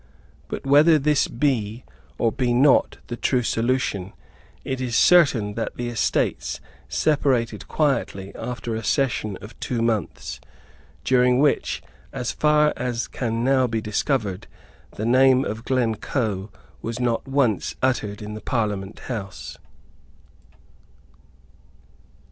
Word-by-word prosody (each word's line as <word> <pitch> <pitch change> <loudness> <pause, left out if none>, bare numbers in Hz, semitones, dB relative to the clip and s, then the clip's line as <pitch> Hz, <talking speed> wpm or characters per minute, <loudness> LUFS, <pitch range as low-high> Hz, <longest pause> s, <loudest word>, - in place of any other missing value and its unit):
But - - -6
whether 150 +4 +6
this 150 0 +2
be 115 -3 -1 0.3
or 115 - +2
be 120 0 0
not 135 +2 +4
the 120 - -5
true 125 +1 +1
solution, 115 -5 -1 0.5
it 130 -1 -3
is 120 -2 -2
certain 135 -14 +5
that 115 - -4
the 120 0 -3
Estates 120 - -1 0.3
separated 135 -6 +1
quietly 115 -10 -1
after 120 -2 -5
a 110 0 -3
session 115 -8 0
of 105 +3 -12
two 120 - -2
months, 110 -5 -2 0.6
during 125 -1 +3
which, 145 +1 +1 0.3
as 125 -3 -3
far 150 0 +3
as 120 -2 -2
can 115 -2 -2
now 130 0 +3
be 115 -1 -1
discovered, 105 -2 -1 0.5
the 110 - -3
name 130 +2 +5
of 110 +3 -5
Glencoe 110 -4 -1 0.3
was 115 +2 -4
not 120 -1 0
once 135 -7 +1
uttered 105 -6 0
in 105 0 -6
the 110 - -7
Parliament 105 -5 -2
House. 100 -7 -6
120 Hz, 120 wpm, -23 LUFS, 110-135 Hz, 0.6 s, whether